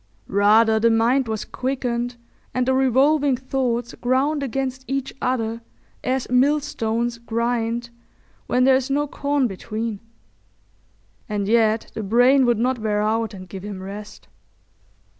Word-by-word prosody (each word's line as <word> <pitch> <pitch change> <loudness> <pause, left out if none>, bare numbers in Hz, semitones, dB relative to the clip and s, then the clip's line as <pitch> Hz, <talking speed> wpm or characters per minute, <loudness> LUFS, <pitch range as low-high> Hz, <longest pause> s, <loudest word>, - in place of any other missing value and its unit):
Rather 220 +3 +4
the 230 +1 +4
mind 235 +3 +2
was 220 -1 -3
quickened 245 -2 -2 0.4
and 250 0 +1
the 260 - +3
revolving 270 +2 +3
thoughts 245 -2 -2
ground 270 +4 0
against 265 0 -3
each 270 0 -3
other 230 -2 -1 0.4
as 260 0 -1
millstones 240 -4 +1
grind 235 +1 -2 0.6
when 250 +1 +2
there 265 +1 +6
is 260 +1 -1
no 290 +2 +1
corn 285 -1 0
between; 215 +1 -4 1.3
and 205 -2 -2
yet 220 0 +2
the 220 - -4
brain 245 +5 +4
would 240 -2 +3
not 250 +2 0
wear 210 -1 0
out 220 0 0
and 185 -1 -10
give 190 +1 -8
him 200 -1 -6
rest. 205 +2 -9
240 Hz, 135 wpm, -22 LUFS, 220-260 Hz, 1.3 s, there